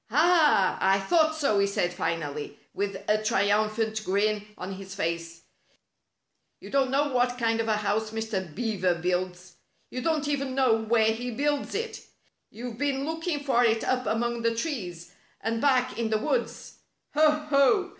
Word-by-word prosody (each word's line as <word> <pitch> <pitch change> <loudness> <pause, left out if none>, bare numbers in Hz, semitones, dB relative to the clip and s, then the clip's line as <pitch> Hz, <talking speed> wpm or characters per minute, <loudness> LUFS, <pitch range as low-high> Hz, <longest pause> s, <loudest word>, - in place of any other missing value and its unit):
" - - -42
Ah! 300 - +4
I 195 +1 +4
thought 315 - +2
so," 280 -10 +1
he 200 - +3
said 180 -3 -1
finally, 165 -5 -3 0.2
with 200 -1 -3
a 215 0 +2
triumphant 215 +1 +1
grin 210 +1 0
on 190 +2 -5
his 195 0 -9
face. 170 -2 -3 0.6
" - - -51
You - - -11
don't 275 -1 +2
know 285 +2 +1
what 245 0 +1
kind 230 -1 +1
of 225 - -1
a 215 -1 +2
house 215 +1 -1
Mr. 220 -3 -3
Beaver 195 -7 0
builds. 180 +1 -3 0.3
You 255 - -4
don't 305 0 0
even 275 -2 -2
know 260 -4 +4
where 220 0 +3
he 245 +2 -5
builds 290 - -1
it. 455 +2 -4 0.5
You've 235 0 -8
been 275 -1 0
looking 320 -1 -3
for 255 -3 +3
it 225 -1 +2
up 255 -1 0
among 235 +1 -1
the 230 0 +1
trees, 195 - -4 0.3
and 225 +1 -2
back 255 -3 +2
in 230 -1 0
the 220 - +2
woods. 480 - -3 0.4
Ho! 310 +1 +5
Ho 300 +5 +2
225 Hz, 170 wpm, -27 LUFS, 200-275 Hz, 0.6 s, Ho